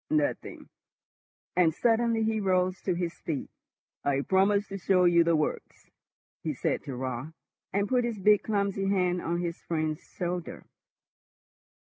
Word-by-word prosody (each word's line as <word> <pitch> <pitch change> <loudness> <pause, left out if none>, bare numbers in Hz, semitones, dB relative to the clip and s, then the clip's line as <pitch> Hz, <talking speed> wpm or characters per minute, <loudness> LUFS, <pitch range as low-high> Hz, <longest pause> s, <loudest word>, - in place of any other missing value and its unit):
"Nothing;" 300 -1 -1 0.9
and 165 -3 +3
suddenly 230 0 +2
he 220 0 +1
rose 185 -2 +1
to 185 - 0
his 175 -1 -2
feet. 155 -5 -4 0.5
"I 140 -1 +1
promised 200 +5 +2
to 195 0 -5
show 180 -1 +3
you 170 -1 +5
the 165 0 +3
works," 155 -1 -3 0.5
he - - -3
said - - -1
to 135 - -5
Raut, 130 +4 -4 0.4
and 200 +1 0
put 250 +1 +2
his 235 -2 -2
big, 210 +1 +4
clumsy 200 -2 -1
hand 180 -2 +1
on 170 +1 -1
his 170 -1 -4
friend's 155 -2 -2
shoulder. 175 -1 -5
185 Hz, 145 wpm, -28 LUFS, 170-205 Hz, 0.9 s, you